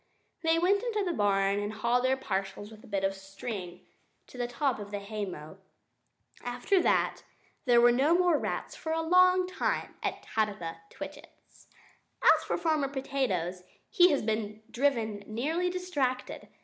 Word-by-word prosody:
They 325 0 +3
went 385 +4 +3
into 445 -4 -1
the 350 - 0
barn 200 -3 +2
and 205 +1 -3
hauled 235 +3 +1
their 265 +1 +2
parcels 195 -2 -4
with 215 0 -14
a - - -14
bit 200 -2 -2
of 195 0 +1
string 195 -1 -7 0.4
to - - -16
the 245 - 0
top 245 0 -1
of 205 -1 -7
the 205 - -3
haymow. 200 -5 -6 0.9
After 245 +10 +1
that, - - +1 0.4
there 240 -2 +6
were 240 0 +7
no 275 +7 +3
more 355 -4 +3
rats - - -3
for 320 - -5
a 325 0 0
long 365 +2 +5
time 370 - -2
at - - -3
Tabitha 195 -7 -2
Twitchit's. - - -12 0.6
As - - +6
for - - -1
Farmer 310 -4 +1
Potatoes, 260 -11 -2 0.3
he 355 0 +6
has 285 - +1
been 215 0 -2
driven 230 -6 0
nearly 310 +11 -1
distracted. 305 -9 -2
240 Hz, 160 wpm, -30 LUFS, 205-320 Hz, 0.9 s, were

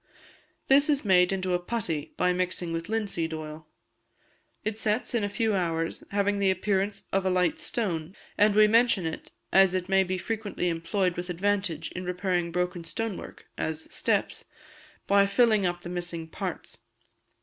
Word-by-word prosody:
This 280 +3 +5
is 285 -5 +1
made 180 -2 +5
into 185 -1 -1
a 175 - +2
putty, 175 -7 -3
by 180 0 +2
mixing 180 -1 -1
with 165 +3 -4
linseed 195 -7 -1
oil. 155 0 -8 1.0
It 215 0 -2
sets 215 +4 0
in 235 -3 +1
a 205 - 0
few 220 +1 0
hours, 165 -3 -1
having 200 0 +1
the 195 -1 +3
appearance 195 +1 0
of 195 0 +2
light 185 - +1
stone; 190 - -2 0.2
and 210 0 +4
we 215 0 +7
mention 225 -4 +3
it, 160 - -5 0.2
as 190 -1 +6
it 185 0 -2
may 195 0 +4
be 185 0 -2
frequently 205 -3 -2
employed 175 +2 -1
with 180 +1 -4
advantage 195 -1 -1
in 185 - -5
repairing 180 -1 -1
broken 180 0 -2
stone 220 +5 -3
work - - -10
(as 160 0 -3
steps), - - 0 0.6
by 200 0 +4
filling 215 -2 +3
up 175 0 -3
the 175 - -8
missing 175 -2 -3
parts. - - -6
185 Hz, 165 wpm, -27 LUFS, 175-205 Hz, 1.0 s, we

